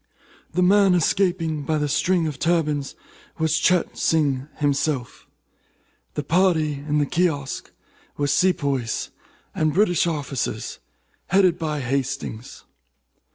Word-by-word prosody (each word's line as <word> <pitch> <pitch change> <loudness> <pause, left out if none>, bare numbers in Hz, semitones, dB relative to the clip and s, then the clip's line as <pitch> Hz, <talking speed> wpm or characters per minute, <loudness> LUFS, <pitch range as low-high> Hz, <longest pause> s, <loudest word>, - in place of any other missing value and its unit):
The 180 +2 +2
man 195 0 +5
escaping 175 -3 +1
by 155 +2 -1
the 150 0 0
string 170 +4 +1
of 150 -4 -4
turbans 155 -5 0 0.4
was 160 0 +1
Cheyte 180 +1 +2
Sing 140 -4 +1
himself. 145 -3 -1 0.9
The 150 - -2
party 165 -4 +2
in 145 +1 -2
the 145 - +2
kiosk 145 -4 -1 0.5
were 145 - 0
sepoys 140 -6 0 0.4
and 155 -1 0
British 175 -4 +3
officers, 145 -5 -3 0.5
headed 185 -2 +3
by 155 -3 -2
Hastings. 130 -3 -4
155 Hz, 110 wpm, -23 LUFS, 140-175 Hz, 0.9 s, man